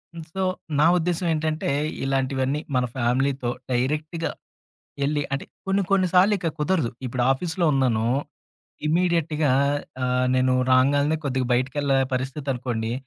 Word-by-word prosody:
హ్మ్. 165 - -7
సో, 190 - -3 0.4
నా 150 - +5
ఉద్దేశం 175 +1 -1
ఏంటంటే, 155 -1 -1 0.3
ఇలాంటివన్నీ 135 +1 0 0.2
మన 125 0 +2
ఫ్యామిలీ‌తో, 130 +1 0 0.2
డైరెక్ట్‌గా 150 +6 -1 0.7
యెళ్లి 145 +1 +1
అంటే, 140 - -3 0.2
కొన్ని 195 +1 +2
కొన్ని 190 -2 +4
సార్లిక 185 -1 +4
కుదరదు, 150 -6 +1
ఇప్పుడు 125 0 -1
ఆఫీస్‌లో 170 +5 -1
ఉన్నానూ, 125 -5 +1 0.8
ఇమీడియట్‌గా 160 -3 +1 0.5
ఆహ్, 125 0 +1
నేను 130 0 +3 0.2
రాంగాల్నే 140 +4 +3
కొద్దిగ 130 -2 0
బయటికెళ్ళే 135 +2 +1 0.2
పరిస్థితనుకోండి, 130 -4 -2
140 Hz, 115 wpm, -24 LUFS, 130-160 Hz, 0.8 s, నా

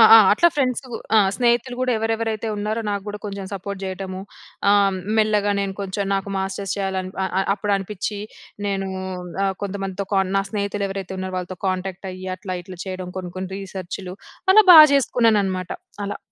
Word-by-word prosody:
ఆ! - - +12 0.2
అట్లా 340 +11 +5
ఫ్రెండ్సు, 260 -2 0 0.3
ఆ! - - +8 0.2
స్నేహితులు 240 0 +1
కూడా 255 0 +1
ఎవరెవరైతే 225 0 -1
ఉన్నారో 215 +2 -1
నాకు 200 -1 -2
కూడా 205 0 -5
కొంచెం 200 -1 -5
సపోర్ట్ 200 0 -5
చేయడము. 190 0 -5 0.5
ఆహ్, 200 -2 +4 0.2
మెల్లగా 210 -1 +3
నేను 195 -1 -2
కొంచెం 200 +1 -2
నాకు 195 +1 -3
మాస్టర్స్ 195 0 -2
చేయాలి 190 -1 -1 0.2
అ - - +1 0.3
అప్పుడు 205 0 -2
అనిపించి 205 +1 -4 0.5
నేను 195 -1 -1 0.6
ఆహ్, 195 -1 +1
కొంతమందితో 195 0 -3
కాన్ 190 -1 +2
నా 195 - +2
స్నేహితులు 200 -1 -1
ఎవరైతే 195 -1 -5
ఉన్నారో 185 0 -4
వాళ్ళతో 180 0 -5
కాంటాక్ట్ 190 +1 -3
అయ్యి 185 +1 -8
అట్లా 185 -1 -5
ఇట్లా 185 0 -10
చేయడం 185 -1 -5
కొన్ని, 180 -1 -5
కొన్ని 185 0 -5
రిసర్చ్‌లు 185 -1 -6 0.4
అలా 430 +2 +8
బాగా 310 -1 +12
చేసుకున్నాను 230 -5 +3
అన్నమాట 185 -2 -3 0.3
అలా. 200 - -4
195 Hz, 165 wpm, -22 LUFS, 190-210 Hz, 0.6 s, ఆ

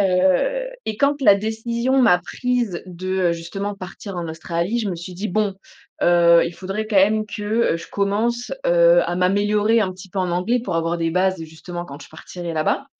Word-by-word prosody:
heu, 190 - +2 0.2
et 215 - -2
quand 280 +3 +1
la 230 -7 +7
décision 235 +5 -1
m'a 200 -8 +5
prise 240 -1 -2
de, 185 +1 -7 0.2
heu, - - +1
justement 195 +5 -5
partir 195 +1 -8
en 175 -1 -3
Australie, 170 +6 -2
je 215 - -2
me 180 - -3
suis 175 +2 -8
dit: 205 +4 -4
«Bon 205 +1 0 0.5
heu, 170 -1 +5
il 170 - -6
faudrait 195 +4 -4
quand 215 -2 -1
même 215 +3 +3
que, 210 0 -7 0.3
heu, - - 0
je 165 - -9
commence, 220 +5 -1 0.2
heu, - - +5
à - - -2
m'améliorer 205 +4 +2
un 190 -3 0
petit 185 +1 -12
peu 190 - -5
en 180 -1 -1
anglais, 185 +8 0
pour 180 - -3
avoir 165 +1 0
des 165 0 0
bases, 185 +2 +1
heu, - - -5
justement 175 +2 -8
quand 145 -3 -10
je - - -14
partirai 170 +2 -8
là-bas» 155 - 0
195 Hz, 210 wpm, -21 LUFS, 175-220 Hz, 0.5 s, la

